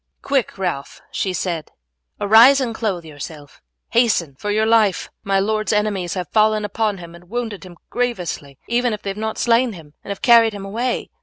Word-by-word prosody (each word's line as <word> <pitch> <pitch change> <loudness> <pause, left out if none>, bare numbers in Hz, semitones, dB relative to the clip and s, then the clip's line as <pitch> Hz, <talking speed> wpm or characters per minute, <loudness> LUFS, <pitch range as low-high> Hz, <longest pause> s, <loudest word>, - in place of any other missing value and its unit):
"Quick, 275 -6 0
Ralph!" 175 -7 -3
she 190 - -1
said, 170 -3 -3 0.5
"arise 230 +7 +7
and 245 -4 -1
clothe 195 -7 -2
yourself. 145 -1 -10 0.3
Hasten, 220 - +2
for 205 - -5
your 215 +1 +2
life. 220 -4 +2
My 195 -1 +1
lord's 215 +2 0
enemies 210 -4 0
have 180 -2 -4
fallen 215 -1 +3
upon 210 0 -1
him 170 -2 -10
and 170 +1 -15
wounded 230 -4 -4
him 175 -1 -14
grievously, 180 - -3
even 240 0 +1
if 210 - -6
they 195 - -2
have - - -7
not 220 0 -3
slain 235 0 +2
him, 155 -5 -13
and - - -11
have 200 - -5
carried 230 -2 +6
him 200 -1 -7
away. 235 +5 -2
210 Hz, 185 wpm, -20 LUFS, 180-230 Hz, 0.5 s, arise